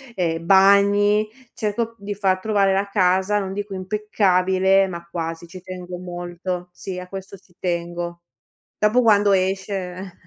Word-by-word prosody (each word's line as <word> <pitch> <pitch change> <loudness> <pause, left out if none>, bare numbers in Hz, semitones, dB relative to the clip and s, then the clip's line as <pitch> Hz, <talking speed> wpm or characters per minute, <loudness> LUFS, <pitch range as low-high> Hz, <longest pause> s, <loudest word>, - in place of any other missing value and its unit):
ehm, 165 -2 -1
bagni, 200 +2 +5 0.3
cerco 225 +1 -2
di 205 0 -5
far 190 -2 +1
trovare 200 -1 +2
la 195 +1 +1
casa, 190 +1 +2
non 195 -2 -4
dico 205 0 -5
impeccabile, 190 -1 +2
ma 170 -2 -8
quasi, 165 0 -5
ci 185 +2 -11
tengo 180 -1 -7
molto. 175 0 -5
Sì, 180 +1 -7
a 180 - -8
questo 195 +1 -8
ci 180 -1 -28
tengo. 170 -1 -3 0.6
Dopo 215 +4 +3
quando 205 -2 +4
esce 190 -1 -2
190 Hz, 140 wpm, -22 LUFS, 180-200 Hz, 0.6 s, bagni